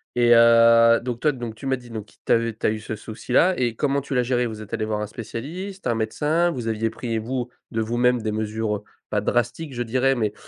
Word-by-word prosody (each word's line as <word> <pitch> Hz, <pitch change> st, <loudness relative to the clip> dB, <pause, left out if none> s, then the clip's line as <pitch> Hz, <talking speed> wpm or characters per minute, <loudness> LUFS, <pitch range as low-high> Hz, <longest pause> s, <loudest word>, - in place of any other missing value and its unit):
Et 120 Hz, -1 st, +5 dB
heu, 115 Hz, 0 st, +6 dB
donc 120 Hz, -1 st, -4 dB
toi 150 Hz, -, +3 dB
donc 120 Hz, -4 st, -6 dB
tu 135 Hz, -, -11 dB
m'as 130 Hz, -1 st, +1 dB
dit 120 Hz, -1 st, -14 dB
donc, 110 Hz, -2 st, -6 dB
t -, -, -22 dB
tu -, -, -1 dB
as, -, -, +6 dB
heu, 115 Hz, -1 st, -2 dB
tu 110 Hz, -, -2 dB
as -, -, +4 dB
eu 110 Hz, -, -3 dB
ce 110 Hz, -, -5 dB
souci-là 125 Hz, -, +1 dB
et 120 Hz, -3 st, 0 dB
comment 140 Hz, +2 st, 0 dB
tu 140 Hz, -, -6 dB
l'as 125 Hz, -, +3 dB
géré? 125 Hz, 0 st, +1 dB
Vous 110 Hz, -1 st, -7 dB
êtes 105 Hz, -, -11 dB
allé 110 Hz, -, -1 dB
voir 110 Hz, -1 st, -2 dB
un 105 Hz, -, -3 dB
spécialiste, 155 Hz, -, -6 dB
un 120 Hz, -, +1 dB
médecin, 150 Hz, +10 st, +1 dB
vous 120 Hz, -5 st, -5 dB
aviez 110 Hz, 0 st, 0 dB
pris 115 Hz, 0 st, -4 dB
vous, 125 Hz, +2 st, -3 dB, 0.2 s
de 115 Hz, -, -2 dB
vous-même, 120 Hz, +1 st, +1 dB
des 110 Hz, -1 st, -2 dB
mesures, 110 Hz, 0 st, -2 dB
heu, 105 Hz, -, -14 dB, 0.3 s
pas 105 Hz, -1 st, 0 dB
drastiques 120 Hz, +6 st, -1 dB
je 120 Hz, -, -4 dB
dirais 130 Hz, +3 st, +1 dB
mais, 110 Hz, -3 st, -1 dB
115 Hz, 260 wpm, -23 LUFS, 110-130 Hz, 0.3 s, heu